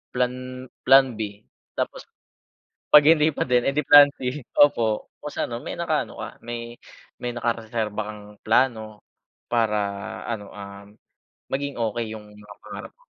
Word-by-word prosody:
plan 125 +1 -2 0.2
plan 135 -1 +7
B. 105 0 -5 0.3
Tapos - - -4 0.9
'Pag 150 -1 +9
hindi 155 -2 +4
pa 145 - -1
din 125 -1 +3
eh 140 - +1
'di 150 - +1
plan 145 0 +9
B. 130 +3 -3 0.2
Opo 115 -7 +3
kung 150 - -5
sa - - -1
ano, 115 0 -5
may - - -6
nakaano 165 -3 -1
ka. - - -5
May 120 0 -6 0.5
may 125 - -2
nakareserba 110 -2 -2
kang 105 -1 -9 0.2
plano 110 -2 +1 0.5
para 115 -3 +2 0.5
ano, 110 -3 -4
um, 100 0 -10 0.7
maging 140 0 -2
okey 115 -1 -2
yung 105 0 -14
mga 105 0 -14
pangarap - - -8
mo. - - -29
120 Hz, 150 wpm, -24 LUFS, 110-135 Hz, 0.9 s, Pag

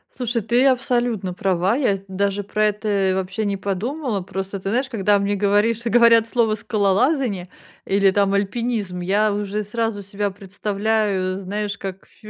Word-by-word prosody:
Слушай, 240 -2 -1
ты 240 +5 +2
абсолютно 245 -7 +1
права. 190 +1 +1
Я 260 -5 +2
ведь 195 0 -7
даже 200 +1 -1
про 215 +2 0
это 205 -2 0
и - - +2
вообще 190 +3 -2
не 200 -1 0
подумала. 210 - -2
Просто 195 +2 -5
ты 195 - -4
знаешь, 255 +5 0
когда 205 -4 +2
мне, 200 +1 0
говоришь 205 +3 +2
говорят 230 -1 +5
слово 230 -2 +1
"скалолазание" 210 - 0 0.4
или, 195 0 +3
там, 200 0 +2
"альпинизм", 200 -2 -1
я 205 +4 +2
уже 205 +1 -2
сразу 225 0 -2
себя 200 +1 -3
представляю, 200 -1 -1
знаешь, 200 +1 -3
как 190 -1 -7
в - - -23
ф - - -8
205 Hz, 165 wpm, -21 LUFS, 195-225 Hz, 0.4 s, говорят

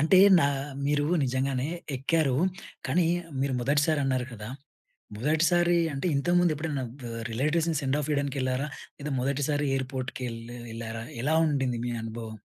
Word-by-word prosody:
అంటే 165 +5 +5 0.2
నా 140 - +4 0.4
మీరు 145 0 +2 0.2
నిజంగానే 130 +1 0 0.3
ఎక్కారు. 140 +1 +1 0.5
కానీ, 165 +6 +2 0.4
మీరు 135 -1 0
మొదటిసారి 145 +4 +2
అన్నారు 130 -2 0
కదా! 105 -1 -7 0.7
మొదటిసారి 170 +7 +3 0.2
అంటే, 140 +6 -2
ఇంతకుముందు 175 +2 +3
ఎప్పుడైనా 150 -3 -2
ఆహ్, 120 -2 -7
రిలేటివ్స్‌ని 155 +7 +1
సెండాఫ్ 145 +2 0
ఇవ్వడానికి 140 -1 -1
ఎళ్లారా? 130 +3 0 0.3
లేదా 150 -1 -4
మొదటిసారి 145 +2 0
ఎయిర్‌పోర్ట్‌కి 130 -1 -4
ఎల్ 115 - -7 0.3
ఎళ్లారా? 115 0 -5 0.2
ఎలా 150 +4 +2
ఉండింది, 135 -5 0
మీ 120 - -1
అనుభవం? 110 0 -6
140 Hz, 135 wpm, -28 LUFS, 125-150 Hz, 0.7 s, అంటే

